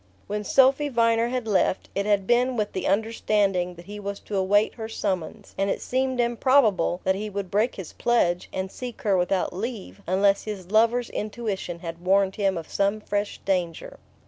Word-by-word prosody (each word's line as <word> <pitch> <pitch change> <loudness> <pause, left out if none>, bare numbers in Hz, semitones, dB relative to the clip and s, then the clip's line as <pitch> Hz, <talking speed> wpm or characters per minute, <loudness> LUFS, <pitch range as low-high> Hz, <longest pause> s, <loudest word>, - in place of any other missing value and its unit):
When 210 +1 -3
Sophy 270 +6 +4
Viner 230 -2 +2
had 245 -2 -3
left, 190 -2 +1
it 200 +1 -1
had 200 -2 +2
been 245 +3 +2
with 210 -1 -1
the 185 - -2
understanding 200 -3 +1
that 170 0 -13
he 205 +2 -8
was 200 0 -5
to 210 - -6
await 200 +3 +3
her 220 -1 -6
summons; 190 -6 -4
and 195 0 +1
it - - -1
seemed 260 0 -1
improbable 235 -7 +3
that 190 - +2
he 210 +3 -4
would 200 -3 -5
break 215 +5 +1
his 190 -4 -8
pledge, 180 -8 +1
and 190 0 -4
seek 245 -3 -8
her 200 -3 +3
without 180 0 0
leave, 210 +1 -6
unless 195 +2 +2
his 195 -4 -6
lover's 230 +2 +3
intuition 205 -5 -4
had 165 0 -7
warned 195 +1 +2
him 195 -3 +1
of 165 - -6
some 200 +2 0
fresh 205 -1 -3
danger. 180 -4 -2
205 Hz, 185 wpm, -25 LUFS, 190-230 Hz, -, Sophy